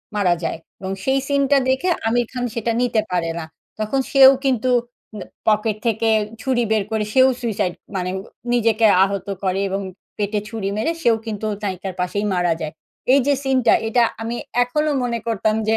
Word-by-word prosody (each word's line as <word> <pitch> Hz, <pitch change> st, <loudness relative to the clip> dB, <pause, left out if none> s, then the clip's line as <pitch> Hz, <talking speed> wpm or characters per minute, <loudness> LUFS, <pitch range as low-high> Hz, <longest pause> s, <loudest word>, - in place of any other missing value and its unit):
মারা 195 Hz, -4 st, +3 dB
যায় 165 Hz, -, -2 dB, 0.2 s
এবং 190 Hz, +1 st, -5 dB
সেই 270 Hz, 0 st, +2 dB
সিনটা 280 Hz, 0 st, +3 dB
দেখে 265 Hz, +8 st, +1 dB, 0.2 s
আমির 240 Hz, +1 st, +2 dB
খান 250 Hz, -1 st, -4 dB
সেটা 230 Hz, 0 st, -1 dB
নিতে 240 Hz, -3 st, +2 dB
পারে 175 Hz, -2 st, 0 dB
না। 160 Hz, -, -5 dB, 0.3 s
তখন 215 Hz, +5 st, 0 dB
সেও 270 Hz, -1 st, +9 dB
কিন্তু 255 Hz, -2 st, +1 dB, 0.5 s
ন -, -, -6 dB, 0.3 s
পকেট 215 Hz, 0 st, +2 dB
থেকে 225 Hz, 0 st, +1 dB, 0.3 s
ছুরি 250 Hz, -2 st, +1 dB
বের 215 Hz, -2 st, +2 dB
করে 220 Hz, -1 st, 0 dB
সেও 260 Hz, 0 st, +6 dB
suicide 210 Hz, -6 st, -1 dB, 0.2 s
মানে 180 Hz, -1 st, -1 dB, 0.4 s
নিজেকে 230 Hz, -2 st, +3 dB, 0.2 s
আহত 195 Hz, 0 st, -2 dB, 0.2 s
করে 190 Hz, 0 st, 0 dB
এবং 195 Hz, +1 st, -2 dB, 0.4 s
পেটে 210 Hz, 0 st, -1 dB
ছুরি 215 Hz, -4 st, -3 dB
মেরে 220 Hz, +10 st, 0 dB
সেও 235 Hz, -5 st, +4 dB
কিন্তু 215 Hz, -1 st, -4 dB, 0.2 s
নায়িকার 190 Hz, -1 st, -3 dB
পাশেই 200 Hz, +3 st, -1 dB
মারা 175 Hz, -2 st, +2 dB
যায়। 155 Hz, -1 st, -4 dB, 0.4 s
এই 280 Hz, -, +6 dB
যে 285 Hz, -, +4 dB
সিনটা 260 Hz, -3 st, +3 dB
এটা 235 Hz, +2 st, +3 dB, 0.2 s
আমি 230 Hz, +1 st, -3 dB, 0.3 s
এখনো 300 Hz, +5 st, 0 dB
মনে 235 Hz, -1 st, -1 dB
করতাম 215 Hz, -1 st, +1 dB
যে, 220 Hz, -, +3 dB
225 Hz, 175 wpm, -21 LUFS, 200-250 Hz, 0.5 s, সেও